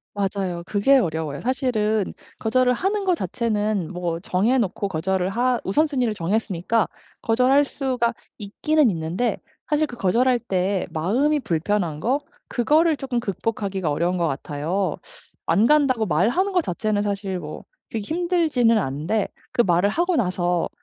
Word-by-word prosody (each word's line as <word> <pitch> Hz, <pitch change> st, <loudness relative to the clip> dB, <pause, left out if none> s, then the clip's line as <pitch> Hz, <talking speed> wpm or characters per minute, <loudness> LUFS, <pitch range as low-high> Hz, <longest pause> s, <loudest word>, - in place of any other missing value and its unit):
맞아요. 195 Hz, -3 st, -2 dB
그게 215 Hz, +8 st, +4 dB
어려워요. 160 Hz, -, -2 dB
사실은 225 Hz, -5 st, 0 dB, 0.3 s
거절을 250 Hz, +3 st, +2 dB
하는 390 Hz, -, -1 dB
거 370 Hz, -2 st, +3 dB
자체는 215 Hz, -, -1 dB
뭐 175 Hz, -2 st, -3 dB
정해놓고 200 Hz, +2 st, 0 dB
거절을 185 Hz, +2 st, -1 dB
하 245 Hz, +3 st, +1 dB
우선순위를 255 Hz, 0 st, +1 dB
정했으니까 200 Hz, +2 st, 0 dB, 0.4 s
거절할 255 Hz, +5 st, +4 dB
수가 255 Hz, -4 st, -1 dB, 0.3 s
있기는 275 Hz, +7 st, +1 dB
있는데 175 Hz, +7 st, -1 dB, 0.3 s
사실 310 Hz, 0 st, +2 dB
그 245 Hz, -, -10 dB
거절할 240 Hz, +6 st, +2 dB
때 190 Hz, -2 st, -1 dB
마음이 255 Hz, -, +1 dB
불편한 170 Hz, -, -1 dB
거 260 Hz, -, +1 dB, 0.3 s
그거를 310 Hz, +6 st, +3 dB
쪼끔 260 Hz, -3 st, -2 dB
극복하기가 195 Hz, -4 st, -2 dB
어려운 170 Hz, +5 st, 0 dB
것 170 Hz, -1 st, +1 dB
같아요. 155 Hz, +7 st, -2 dB, 0.5 s
안 215 Hz, +3 st, +4 dB
간다고 260 Hz, -6 st, +3 dB
말하는 235 Hz, -, +1 dB
거 365 Hz, -, +3 dB
자체는 210 Hz, -, -1 dB
사실 200 Hz, -2 st, -2 dB
뭐 -, -, -8 dB, 0.3 s
그렇게 225 Hz, -, -3 dB
힘들지는 320 Hz, -9 st, +2 dB
않은데 170 Hz, +6 st, -1 dB, 0.2 s
그 240 Hz, -, +3 dB
말을 180 Hz, 0 st, +3 dB
하고 345 Hz, -, +1 dB
나서 180 Hz, -, 0 dB
215 Hz, 325 characters per minute, -23 LUFS, 180-255 Hz, 0.5 s, 그게